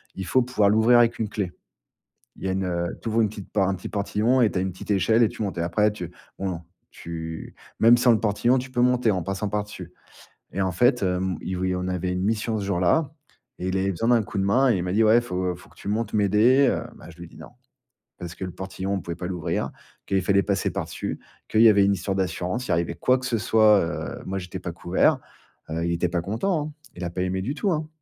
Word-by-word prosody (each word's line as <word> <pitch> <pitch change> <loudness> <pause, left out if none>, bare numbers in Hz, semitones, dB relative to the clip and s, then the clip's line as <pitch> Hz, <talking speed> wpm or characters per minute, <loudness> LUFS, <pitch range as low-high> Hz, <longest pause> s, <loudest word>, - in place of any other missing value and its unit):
il 95 - -5
faut 130 - +3
pouvoir 115 -5 +2
l'ouvrir 110 +3 +5
avec 120 -1 +3
une 110 - 0
clé. 100 -4 -3 0.8
Il - - -13
y 95 - 0
a - - 0
une, 95 0 -1
heu 85 -1 -2
tu 115 - -3
ouvres 115 +1 +2
une 110 - +2
petite 100 -2 -10
part 95 -3 +2
un 95 - 0
petit 90 - -8
portillon 110 +5 +1
et 115 - +4
tu - - -3
as - - 0
une 95 - -2
petite 90 - -11
échelle 110 +4 +3
et 110 - +3
tu - - -5
montes. 100 -3 -4
Et - - +1
après, 105 +5 +2
tu 90 -4 -7 0.3
non, 95 -1 -1
non, 85 -2 -5 0.3
tu 80 -1 -7 0.2
même 115 +2 +7
sans 120 0 +4
le 110 - +3
portillon, 115 +4 +2
tu 130 +1 -4
peux 120 - 0
monter 125 -2 +3
en 95 - -1
passant 100 +2 -3
par 105 0 -1
dessus. 95 -4 -10 0.6
Et 95 - -1
en 95 - +1
fait, 120 +7 +3
hem, 90 -2 0
il 95 - -4
v 95 0 0
il 90 - 0
on 90 0 -3
avait 90 0 -2
une 90 0 -2
mission 110 +1 0
ce 100 - -4
jour-là, 100 - +1 0.5
et 90 - -3
il 95 - 0
avait 95 +1 0
besoin 115 +6 -1
d'un 120 -2 +5
coup 100 - -7
de 95 - +1
main, 130 +7 +3
et 105 - +2
il 90 - -2
m'a 90 - -2
dit: 110 +3 +4
«Ouais, 110 +1 +6
il - - +4
faut 90 -5 -2
il - - -14
faut - - -17
que - - -23
tu - - -11
montes 110 +1 -1
m'aider, 110 +7 +4
heu». - - -1
Bah - - -13
je 80 - -14
lui 85 - -9
ai - - -12
dit - - -17
non. - - -11 0.7
Parce 85 -1 -7
que 95 - -5
le 90 - -6
portillon, 95 +1 -5
on 95 - -1
pouvait 85 0 -5
pas 90 - -6
l'ouvrir, 90 -3 -2 0.4
qu'il 95 -1 +1
fallait 100 +1 +3
passer 100 -1 0
par-dessus, - - -4 0.3
qu'il 110 - +3
y 115 - +9
avait 100 -2 +5
une 100 - +3
histoire 95 +1 -2
d'assurance. 95 +5 -2
Il - - -2
arrivait 85 0 0
quoi 125 +9 +2
que 130 - -7
ce 120 -2 0
soit, 110 -1 +5
heu, 85 0 -4
moi 95 +1 -3
j'étais 90 0 -7
pas 90 - -5
couvert, 85 +2 +2 0.5
heu. 80 +1 -2
Il 85 - 0
était 85 +1 0
pas 85 0 -1
content, 150 - -1
hein, - - -13 0.2
il 90 - -7
a - - -2
pas 90 - -3
aimé 95 +1 -1
du 130 +9 -3
tout, 195 +4 0
hein. 155 -2 -1
100 Hz, 275 wpm, -24 LUFS, 90-115 Hz, 0.8 s, y